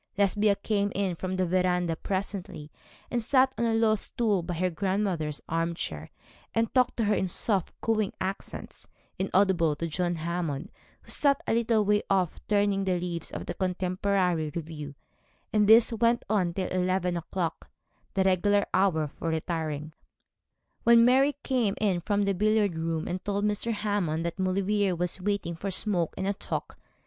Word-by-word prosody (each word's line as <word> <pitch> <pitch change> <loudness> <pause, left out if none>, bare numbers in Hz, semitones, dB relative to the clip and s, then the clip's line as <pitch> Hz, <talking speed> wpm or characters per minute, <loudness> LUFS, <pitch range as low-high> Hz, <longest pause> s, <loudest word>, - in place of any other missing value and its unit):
Lesbia 205 +1 +3
came 205 -1 -1
in 195 -2 0
from 185 +2 -3
the 185 0 +1
verandah 180 -1 +1
presently, 190 -5 -4 0.4
and 240 - 0
sat 260 +3 +3
on 235 - 0
a 225 -1 +2
low 225 -1 +4
stool 215 -2 0
by 170 +1 -4
her 180 +2 0
grandmother's 185 -4 -1
arm 165 +1 -1
chair, 80 - -5 0.5
and 225 0 +1
talked 255 -1 +2
to 230 - +1
her 210 0 +2
in 190 - 0
soft, 190 +1 0
cooing 215 -3 +1
accents, 190 +1 -6 0.3
inaudible 185 -5 +2
to 165 - -3
John 175 +2 -1
Hammond, 165 -3 -3 0.3
who - - -10
sat 280 -2 +3
a - - 0
little 225 -2 +2
way 210 +1 +3
off 185 -4 +1
turning 205 -1 +2
the 185 -2 0
leaves 170 -2 -4
of - - -6
the - - -4
Contemporary 185 -3 0
Review: 150 -3 -6 0.6
and 210 -1 +3
this 230 +1 +7
went 230 +1 +2
on 185 -5 +1
till 190 - -2
eleven 185 -1 0
o'clock, 170 0 -4 0.5
the 190 - +3
regular 200 +2 +3
hour 180 -5 +2
for 165 - -2
retiring, 160 -2 -3 0.9
when 235 0 +7
Mary 270 +3 +4
came 240 -7 +1
in 195 -5 +1
from 205 +3 +1
the 200 - +1
billiard 210 -1 +2
room, 160 -1 -2
and 180 +1 -3
told 205 0 -1
Mr. 210 +2 0
Hammond 205 -7 -1
that 170 +3 -4
Maulevrier 195 +1 +1
was 180 +2 -2
waiting 200 -3 -1
for 180 +5 -5
a - - -1
smoke 185 -3 0
and - - -2
a 200 - +1
talk. - - -5
190 Hz, 170 wpm, -28 LUFS, 170-210 Hz, 0.9 s, this